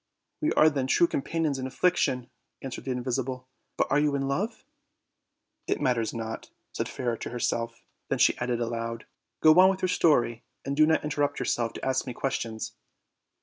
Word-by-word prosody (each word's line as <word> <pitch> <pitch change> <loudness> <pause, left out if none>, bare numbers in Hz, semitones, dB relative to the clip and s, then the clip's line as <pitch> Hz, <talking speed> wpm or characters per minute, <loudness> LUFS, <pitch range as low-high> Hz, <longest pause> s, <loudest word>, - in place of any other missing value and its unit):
"We 310 - +1
are 155 - +6
then 140 -4 +1
true 170 - +4
companions 155 -2 -1
in 130 - -3
affliction," 130 -4 +1 0.3
answered 135 -2 -6
the 135 - -2
invisible. 130 0 -3 0.3
"But - - +3 0.2
you 150 -1 +2
are - - +1
irr 135 0 -1
love?" 190 +12 -2 1.0
"It - - 0
matters 115 -4 +1
not," 115 -1 -6 0.2
said - - -2
Fairer 120 -3 -2
to - - -6
herself; 115 -1 -2 0.3
then - - +1
she - - +4
added 120 -1 -1
aloud: 115 0 -3 0.4
"Go 155 +2 +7
on 185 +1 +8
with 190 0 -2
your 185 - +2
story, 120 -10 +2 0.2
and 140 - -2
do 155 +1 +5
not 160 - +2
inter 150 0 -2
rupt 145 0 +1
yourself 120 -2 -1
to - - -6
ask 130 0 0
me 125 - -4
questions." 115 -5 -3
130 Hz, 185 wpm, -27 LUFS, 120-150 Hz, 1.0 s, on